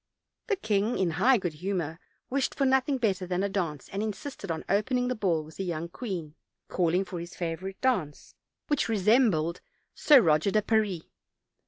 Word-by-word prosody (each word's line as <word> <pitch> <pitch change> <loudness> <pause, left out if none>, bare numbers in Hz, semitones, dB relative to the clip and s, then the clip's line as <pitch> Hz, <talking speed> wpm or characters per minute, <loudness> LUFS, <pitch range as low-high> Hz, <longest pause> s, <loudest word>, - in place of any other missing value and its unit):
The 410 - +2
king, 220 - 0
in 185 -3 +1
high 250 +10 +4
good 175 -5 -3
humcr, 175 -4 -2 0.3
wished 270 0 -1
for 275 - +1
nothing 265 +1 +2
better 195 -6 0
than 180 +1 -1
a 200 - 0
dance, 170 -7 -3
and 195 - -3
insisted 215 0 -5
on 160 -1 -3
opening 245 +5 +1
the 255 - -1
ball 175 -8 0
with 155 +1 -14
the 195 - -2
young 170 -2 -3
queen, 175 -7 -5 0.4
calling 180 +1 +1
for 180 -2 -6
his 170 +1 -8
favorite 180 +3 -4
dance, 190 - -1 0.3
which 295 -5 0
re 225 - +1
sembled 190 -6 +3 0.3
"Sir 295 -3 +6
Roger 160 -2 +3
de 215 +1 +2
Paris." 210 -6 +1
195 Hz, 180 wpm, -28 LUFS, 170-230 Hz, 0.4 s, Sir